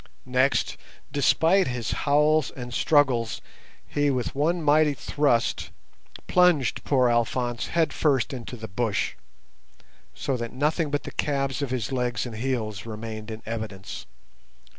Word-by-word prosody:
Next, 130 +1 +1 0.3
despite 160 +7 +3
his 125 -3 -2
howls 150 0 +3
and 125 -1 -8
struggles, 130 -8 +2 0.5
he 145 0 +1
with 130 -3 -1
one 160 +5 0
mighty 150 0 +4
thrust 130 -4 0 0.6
plunged 180 -8 +3
poor 130 -3 +3
Alphonse 120 0 0
head 165 -1 +1
first 135 -5 +1
into 125 -1 -6
the 110 0 -7
bush, 105 +1 -1 1.0
so 135 - -1
that 115 -1 -5
nothing 150 +4 0
but 145 0 -1
the - - -7
calves 135 -2 -1
of 140 - -1
his 125 -3 -2
legs 125 -3 -1
and 115 -3 -6
heels 110 -4 -2
remained 110 0 -6
in 110 0 -7
evidence. 110 -4 -6
130 Hz, 135 wpm, -26 LUFS, 115-145 Hz, 1.0 s, mighty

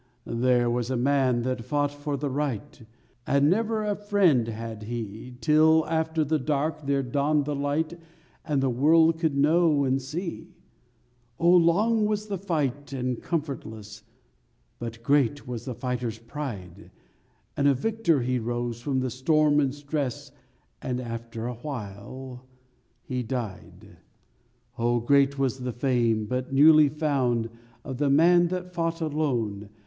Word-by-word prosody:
_ 115 0 -3
There 125 -1 +3
was 120 0 -1
a 130 - 0
man 130 -2 +2
that 125 -1 -2
fought 145 +2 0
for 145 0 -4
the 145 0 -3
right, 145 0 -3 0.5
And 140 +2 +3
never 220 +2 0
a 210 -1 0
friend 195 - +2
had 115 -1 -6
he, 115 +2 -6
'Till 155 +4 +4
after 160 0 0
the 155 +1 0
dark 150 +1 -2
there 140 -1 +1
dawned 145 +3 +1
the 150 - -2
light 155 +4 -2 0.4
And 145 -4 0
the 135 - +2
world 160 +5 +4
could 160 -4 0
know 155 0 +3
and 135 0 +1
see; 165 +7 -6 0.8
Oh, 170 +1 +4
long 210 +6 +3
was 210 0 -1
the 195 -3 -3
fight 145 -7 -2
and 125 -2 -2
comfortless, 110 -9 -5 0.8
But 115 -1 -7
great 145 +1 +1
was 120 -2 -5
the 130 -3 -5
fighter's 125 -2 -3
pride, 115 - -7 0.7
And 140 - +2
a 140 - +4
victor 175 - +1
he 125 +1 0
rose 120 0 -3
from 130 0 -1
the 130 -1 -2
storm 150 +3 +3
and 140 -3 +2
stress— 140 -2 -4 0.5
And 125 -1 -2
after 115 -1 -6
awhile 125 0 -7 0.6
he 125 -1 -3
died. 115 -5 -6 0.8
_Oh, 120 0 +1
great 140 +1 +3
was 135 -1 0
the 125 0 -3
fame 120 -3 +1
but 125 +3 -3
newly 150 +2 +7
found 130 -7 0 0.3
Of 130 -3 -6
the 145 -1 +2
man 175 +5 +5
that 180 0 -5
fought 165 -1 -1
alone! 125 -10 -2
140 Hz, 145 wpm, -26 LUFS, 120-155 Hz, 0.8 s, newly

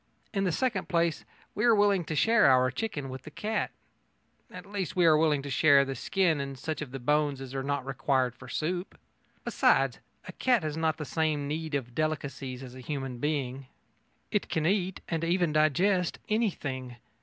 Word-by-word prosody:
In 195 -1 0
the 180 - +1
second 220 -1 -1
place, 170 -3 +1 0.3
we 210 - -2
are 235 -2 +6
willing 205 -3 +3
to 155 - -3
share 225 +5 +5
our 130 -1 +4
chicken 145 - -3
with 130 0 -7
the 155 - -10
cat 210 +8 -2 0.8
at - - -10
least, 200 -5 -4
we 180 -2 +4
are 160 -2 +7
willing 150 -3 +2
to 140 - -6
share 140 +1 +5
the 135 - -3
skin 160 +3 +1
and 140 -1 -5
such 155 +4 -4
of 150 - -5
the 135 - -6
bones 145 +1 +1
as 135 -1 -8
are 135 - -2
not 140 -1 -2
required 130 -2 0
for 125 +1 -13
soup. 175 +7 -3 0.5
Besides, - - +2 0.3
a - - -6
cat 245 -7 +2
has 155 -1 -2
not 160 -1 0
the 150 - -5
same 150 0 0
need 155 0 -3
of 125 -3 -3
delicacies 140 -3 -3
as 125 -2 -9
a 130 - -10
human 135 -2 -4
being. 135 -2 -2 0.6
It - - 0
can 155 - 0
eat, 190 0 0
and 165 -1 -2
even 170 -1 +1
digest, 175 +4 +2
anything. 145 - -2
155 Hz, 190 wpm, -29 LUFS, 135-180 Hz, 0.8 s, are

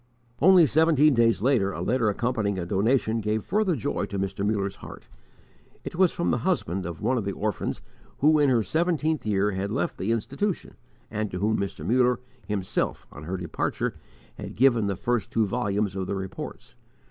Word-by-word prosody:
Only 180 +1 +7
seventeen 155 0 +4
days 115 -3 +3
later, 120 -7 +2
a - - -5
letter 115 +2 +1
accompanying 105 -2 -1
a 90 - -3
donation 110 +4 +1
gave 110 0 -1
further 205 -5 +1
joy 145 - -2
to 100 - -5
Mr. 95 +1 -2
Muller's 100 -2 -1
heart. - - -11 0.8
It - - -6
was 185 0 +4
from 170 - -1
the - - +1
husband 95 - -1
of 85 -2 -7
one 130 -1 +2
of - - -3
the 100 0 -3
orphans 105 -1 -3 0.4
who, 155 +2 +4
in 145 -2 +4
her 120 -4 +3
seventeenth 160 - 0
year, 105 0 +2
had 100 +1 -3
left - - -2
the 100 +5 -1
institution, 140 - -2 0.4
and 110 -1 -2
to 90 - -5
whom 105 +4 +1
Mr. 100 -1 -4
Muller 125 +1 +3 0.3
himself, 100 -3 -2
on 70 - -10
her 95 +3 -3
departure, 90 -3 -2 0.5
had - - -7
given 120 -4 +4
the 100 - -1
first 120 +1 -1
two 110 -1 +1
volumes 100 -3 -1
of 95 -1 -3
the 100 - -2
Reports. 95 -1 -7
110 Hz, 185 wpm, -26 LUFS, 100-135 Hz, 0.8 s, Only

